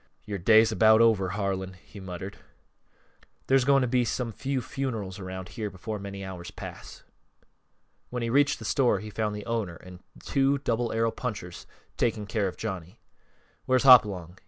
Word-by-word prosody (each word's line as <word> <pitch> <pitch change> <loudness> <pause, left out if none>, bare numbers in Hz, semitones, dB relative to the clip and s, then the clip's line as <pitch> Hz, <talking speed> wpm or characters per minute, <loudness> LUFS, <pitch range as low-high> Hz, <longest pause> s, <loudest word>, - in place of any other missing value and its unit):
"Yore 100 -2 -4
day's 110 +4 +5
about 110 +1 +5
over, 110 -5 +4
Harlan," 95 -1 -2
he 95 +3 -14
muttered. 95 +1 -7 1.1
"There's 135 -1 +3
going 140 0 +5
to - - +1
be 125 0 +2
some 120 0 -2
few 135 +4 -2
funerals 115 -8 -4
around 95 -1 -7
here 105 +4 -4
before 105 +3 -6
many 100 0 -7
hours 90 -2 -7
pass." - - -10 1.1
When 125 -1 -3
he 115 - -1
reached 145 +2 +3
the - - -9
store 125 -7 +2
he 105 +1 -8
found 105 -1 -2
the 105 - -7
owner 110 -7 -2
and 90 +1 -13 0.3
two 140 0 +2
Double 120 -3 -1
Arrow 115 0 +1
punchers 100 -9 -6 0.3
taking 110 -3 0
care 100 0 -1
of 90 - -6
Johnny. 95 -6 -6 0.7
"Where's 130 -1 +3
Hopalong?" 100 -9 +5
105 Hz, 165 wpm, -27 LUFS, 95-120 Hz, 1.1 s, day's